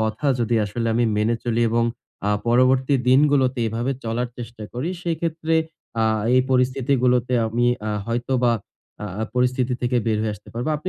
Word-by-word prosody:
কথা 110 +6 -1
যদি 120 0 +1
আসলে 115 +3 -3
আমি 120 - +2
মেনে 110 +3 +2
চলি 120 -1 0
এবং 115 0 +2 0.4
আ - - +2 0.2
পরবর্তী 130 +3 +3
দিনগুলোতে 135 -1 +4
এভাবে 120 +5 -1
চলার 115 +2 -1
চেষ্টা 115 -2 -8
করি, 125 +7 -3
সেইক্ষেত্রে 165 -1 -1 0.5
আ - - +3 0.3
এই 130 - +6
পরিস্থিতিগুলোতে 125 -1 +2
আমি 120 +2 +1 0.2
আ - - -1 0.2
হয়তোবা 120 +1 +1 0.5
আ - - -4 0.3
পরিস্থিতি 125 0 +1
থেকে 125 0 +1
বের 110 -1 +1
হয়ে 110 -1 -1
আসতে 105 - -16
পারবো। 120 +6 -3
আপনি 155 +5 -5
125 Hz, 160 wpm, -22 LUFS, 115-130 Hz, 0.5 s, এই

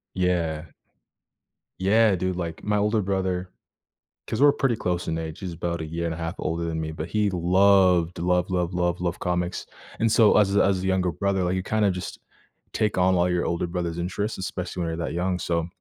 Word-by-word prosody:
Yeah. 85 -4 -1 1.1
Yeah, 105 +2 +4
dude, 95 +1 -2
like, 85 -2 -5
my 105 0 +1
older 105 +1 +2
brother 95 -2 -1 0.8
'cause 110 - -2
we're 145 0 +7
pretty 130 -4 +1
close 90 -3 -2
in 80 - -1
age. 80 -1 -5
He's 90 -3 -5
about 85 0 -3
a - - -4
year 85 +2 -4
and 85 - -1
a - - -7
half 80 -1 -4
older 85 +1 -2
than 80 -1 -2
me. 80 0 -3
But 80 +1 -6
he 105 +1 +1
loved, 90 -1 +3
loved, 90 +1 +1
loved, 90 -1 -1
loved, 90 0 0
loved 85 -1 -2
comics. 90 0 -2 0.3
And 115 0 +2
so 110 -3 +5
as 100 -1 +3
a - - +5
as 95 -1 +1
a - - -1
younger 95 -2 +1
brother, 95 +3 0
like, 90 +1 0
you 95 - -2
kind 110 +1 +1
of 95 - +2
just 90 -1 -6 0.5
take 105 -3 0
on 95 0 +3
all 90 0 +2
your 90 -1 0
older 85 +1 -1
brother's 85 -1 -3
interests. 100 +5 -3
Especially 90 -1 -4
when 85 - -1
you're 80 - -4
that 85 - -3
young. 90 +1 -1
So, 85 -2 -1
90 Hz, 215 wpm, -25 LUFS, 85-95 Hz, 1.1 s, we're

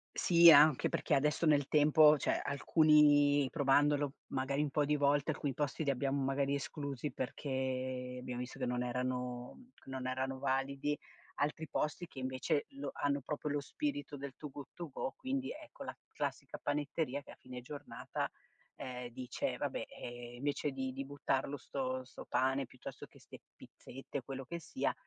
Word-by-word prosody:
Si 170 -1 +7
e - - +13
anche 150 -2 +7
perché - - 0
adesso 150 +4 +2
nel 145 -2 +4
tempo 150 0 +6
cioè - - +1
alcuni 145 -1 +5
provandolo, 145 -1 +3 0.2
magari 135 +2 0
un 150 - 0
po' 150 +1 +2
di 150 +1 +2
volte, 145 0 +3
alcuni 140 -3 -2
posti 145 +2 -1
li 140 - +2
abbiamo 140 +1 0
magari 135 +1 +1
esclusi 140 0 -4
perché 130 -1 -3
abbiamo 125 -1 -5
visto 125 +2 -6
che 130 - -1
non 125 0 0
erano 125 - -3 0.2
non 130 -1 -5
erano 130 +1 -2
validi, 140 +2 0 0.4
altri 150 +2 -1
posti 155 +4 -1
che 135 - -12
invece 130 +4 0
lo 140 0 -5
hanno 140 0 0
proprio 150 +2 -3
lo 145 0 0
spirito 290 - -3
del 140 0 -6
Too 150 - -7
Good 140 0 -8
To 170 -2 -6
Go 135 -1 -4
quindi 265 0 -2
ecco 305 -1 -10
la - - -6
classica - - -4
panetteria 145 -1 -1
che - - -14
a - - -12
fine 125 -1 -8
giornata, 140 +4 -5 0.5
ehm, 125 -1 -6
dice: 125 +1 -3
"Vabbè, - - -2
ehm, 120 0 -8
invece 145 +2 -1
di 130 -1 -3
di 135 +1 -4
buttarlo 140 0 -1
sto 130 -1 -3
sto 130 - -10
pane 135 +1 +1
piuttosto 125 +1 -9
che - - -19
ste - - -12 0.2
pizzette 135 +1 -8
quello 135 +1 -6
che 170 +6 -5
sia" 165 - -1
140 Hz, 170 wpm, -35 LUFS, 130-150 Hz, 0.5 s, e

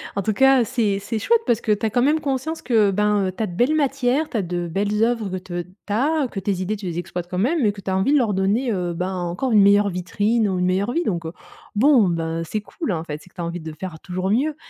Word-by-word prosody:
en 200 - 0
tout 215 - 0
cas, 270 +2 +5
heu, - - +3
c'est 220 -4 0
c'est 220 +2 -3
chouette, 460 - +3
parce 235 -1 +1
que 215 - 0
tu 210 +2 +1
as - - +2
quand 245 - +2
même 300 +5 +3
conscience 285 +3 -3
que, 220 -5 +3
ben, 205 0 +1
heu, 185 - -2
tu 185 - -4
as 215 - -1
de 175 - -7
belles 250 - +2
matières, 275 0 +1
tu 235 - -2
as - - +1
de 175 -1 -3
belles 205 +5 0
œuvres 230 -3 0
que 185 - -3
t 175 0 -2
tu 190 +3 -9
as, 285 +5 +1
que 195 - -4
tes 190 -1 -2
idées 205 +4 -1
tu 200 -3 -7
les 170 -1 -4
exploites 175 0 -5
quand 180 - -4
même, 280 - +1
mais 210 -3 +3
que 200 - -10
tu 190 - -4
as 190 - +1
envie 250 +10 +2
de - - +5
leur 230 -7 +1
donner, 210 +6 +1
heu, 180 -3 -2
ben, 185 +2 -2
encore 180 +8 -2
une 210 -2 +6
meilleure 200 +1 +5
vitrine 205 +4 0
ou 185 - -1
une 180 - +1
meilleure 190 +6 0
vie 340 - +1
donc 170 - -2
heu, 160 - -7 0.4
bon, 240 -2 +5
ben, 165 0 -2
c'est 210 +6 -3
cool, 280 - -5
en 165 -3 -2
fait, 150 -2 -6
c'est - - -17
que 185 - -35
tu 175 - -5
as 170 - -2
envie 170 +1 -4
de 160 0 -7
faire 180 -4 -6
toujours 185 +1 -3
mieux, 290 +7 +1
205 Hz, 300 wpm, -22 LUFS, 180-245 Hz, 0.4 s, une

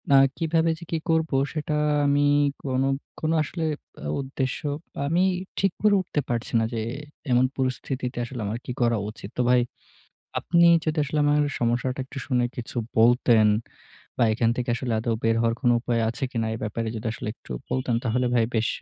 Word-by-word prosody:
আ - - +9 0.2
কিভাবে 165 0 +2
যে - - -9
কি 165 - +1
করবো, 160 -3 +2 0.2
সেটা 150 -1 -2 0.3
আমি 145 +1 +3 0.4
কোনো, 135 0 0 0.3
কোনো 155 +1 0
আসলে 165 +3 -4 0.4
আ - - -2
উদ্দেশ্য, 130 -1 -3 0.5
আমি 170 +5 +2 0.4
ঠিক 195 -2 +2
করে 210 -1 +5
উঠতে 175 -4 -3
পারছি 120 -1 -2
না - - +1
যে 115 - -1 0.5
এমন 125 +1 +5
পরিস্থিতিতে 130 0 -2
আসলে 120 0 -6
আমার 105 +3 -2
কি - - -4
করা 120 -1 +3
উচিত। 105 -2 -9
তো - - +4
ভাই, 125 -1 +5 0.8
আপনি 170 0 +3 0.2
যদি 155 0 -1
আসলে 150 +2 -2
আমার 145 0 +3 0.2
সমস্যাটা 120 +3 0
একটু 135 +1 -8
শুনে 125 -3 +2
কিছু 120 0 -7 0.2
বলতেন 115 -1 +5 0.7
বা - - +5
এখান 115 +1 +2
থেকে 125 -1 -1
আসলে 125 -2 -3
আদৌ 115 +1 -1
বের 115 0 +3
হওয়ার 115 0 +2
কোনো 120 -3 +4
উপায় 120 -1 0
আছে 120 +4 -3
কিনা, 115 -3 -1
এ - - -3
ব্যাপারে 110 +1 -2
যদি 110 +1 -3 0.3
একটু - - -21 0.2
বলতেন 130 -2 0
তাহলে 125 +2 +1
ভাই 115 -2 +4
বেশ 110 0 +2
125 Hz, 180 wpm, -25 LUFS, 115-145 Hz, 0.8 s, আ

